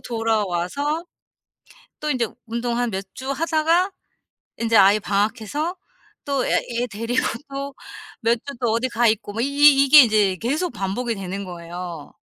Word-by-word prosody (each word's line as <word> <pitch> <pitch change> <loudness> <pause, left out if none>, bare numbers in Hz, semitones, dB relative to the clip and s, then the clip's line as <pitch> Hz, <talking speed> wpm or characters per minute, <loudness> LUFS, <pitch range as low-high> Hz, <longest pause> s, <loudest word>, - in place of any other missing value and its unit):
돌아와서 225 - -1 1.0
또 305 0 -1
인제 245 -4 0 0.2
운동 235 +1 -2
한 245 -1 0
몇 190 0 -3
주 265 +1 -4
하다가 330 +5 +1 0.7
인제 230 -1 +1
아이 200 +1 +6
방학해서 220 - -1 0.5
또 275 -2 0
애 - - 0 0.3
애 - - 0
데리고 230 +3 -1 0.3
또 275 0 -5 0.5
몇 230 +1 +3
주 280 - -6
또 240 -3 +1
어디 235 +3 0
가 235 -1 +2
있고 215 -1 -1
뭐 225 - -4
이 - - +2
이 280 0 +6
이게 285 +1 +9
인제 210 -5 +3
계속 295 - -1
반복이 230 +3 -2
되는 195 +1 -5
거예요. 175 -3 -8
235 Hz, 270 characters per minute, -22 LUFS, 205-280 Hz, 1.0 s, 이게